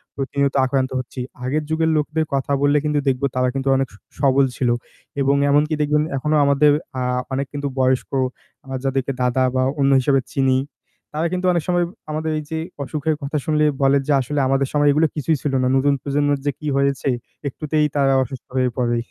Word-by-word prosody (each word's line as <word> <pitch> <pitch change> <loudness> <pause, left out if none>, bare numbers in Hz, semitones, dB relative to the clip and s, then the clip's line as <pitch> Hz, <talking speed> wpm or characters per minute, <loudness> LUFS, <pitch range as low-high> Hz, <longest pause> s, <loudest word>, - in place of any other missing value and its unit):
প্রতিনিয়ত 140 0 -1
আক্রান্ত 130 0 0
হচ্ছি। 130 +1 -7 0.3
আগের 150 +4 0
যুগের 160 0 +1
লোকদের 150 +1 0
কথা 140 +1 -1
বললে 145 +1 +4
কিন্তু 150 -1 +1
দেখবো 135 +1 +1
তারা 125 0 +2
কিন্তু 135 0 -2
অনেক 135 -1 +1
স - - -15 0.2
সবল 140 -1 +4
ছিল 125 -2 0 0.5
এবং 140 +1 +3
এমনকি 150 +2 +3
দেখবেন 150 +1 +2
এখনো 150 +3 0
আমাদের 140 +1 +4 0.3
আ - - -2 0.3
অনেক 140 +1 -1
কিন্তু 145 0 -3
বয়স্ক 130 0 +1 0.5
আমরা 135 0 -5
যাদেরকে 135 0 0
দাদা 125 +1 +2
বা 130 - +2 0.2
অন্য 140 0 +3
হিসাবে 135 0 +2
চিনি, 135 -2 +2 0.6
তারা 160 +3 0
কিন্তু 185 0 -2
অনেক 170 -3 0
সময় 175 -1 +2 0.3
আমাদের 155 +1 -2
এই - - -6
যে 160 - -1 0.2
অসুখের 155 +2 -1
কথা 140 +2 -2
শুনলে 150 -1 +2 0.2
বলে 135 +1 +4
যে - - +1
"আসলে 145 +3 -2
আমাদের 135 0 +1
সময় 145 0 +4
এগুলো 155 +2 +3
কিছুই 150 +1 0
ছিল 145 - -2
না। - - +2
নতুন 140 +1 +3
প্রজন্মের 145 0 0
যে 145 - +2
কি 150 - -6
হয়েছে! 140 0 +1 0.4
একটুতেই 150 +2 0
তারা 135 -1 +3
অসুস্থ 130 -1 -9
হয়ে 130 -1 +2
পড়ে।"। 120 -1 +1
140 Hz, 190 wpm, -21 LUFS, 135-150 Hz, 0.6 s, বললে